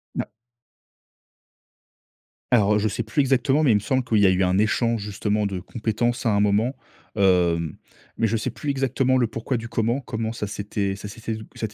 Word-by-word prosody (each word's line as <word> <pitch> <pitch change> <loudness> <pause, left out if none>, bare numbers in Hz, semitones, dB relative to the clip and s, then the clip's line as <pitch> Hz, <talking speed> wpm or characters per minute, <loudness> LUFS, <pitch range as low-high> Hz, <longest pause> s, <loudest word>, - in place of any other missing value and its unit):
Na - - -3 2.2
Alors 105 -4 +4
heu, 105 - +3
je 110 - +1
sais 120 +3 -2
plus 110 +6 -3
exactement, 135 +1 +3
mais 145 -6 +4
il - - +4
me - - +3
semble 130 +5 0
qu'il 115 -3 +1
y 100 - +5
a - - +6
eu 95 +1 +2
un 90 +1 +2
échange 115 +2 +1
justement 105 +1 -1
de 95 -2 -2
compétences 120 +4 -2
à 115 - +3
un 100 - +2
moment, 105 +6 +2 0.4
hem, 90 -5 +2 0.4
mais - - +1
je 110 +1 +1
sais 120 +4 -2
plus 140 +5 -3
exactement 130 -1 +1
le 120 - +2
pourquoi 115 +4 -3
du 115 0 -7
comment. 115 +3 0
Comment 110 -3 -4
ça 105 -3 -4
s'était, 100 -1 -3
ça 100 +1 -8
s'était 110 +2 -5 0.2
ça 110 - -3
s'était 105 - -16
110 Hz, 205 wpm, -24 LUFS, 100-120 Hz, 2.2 s, a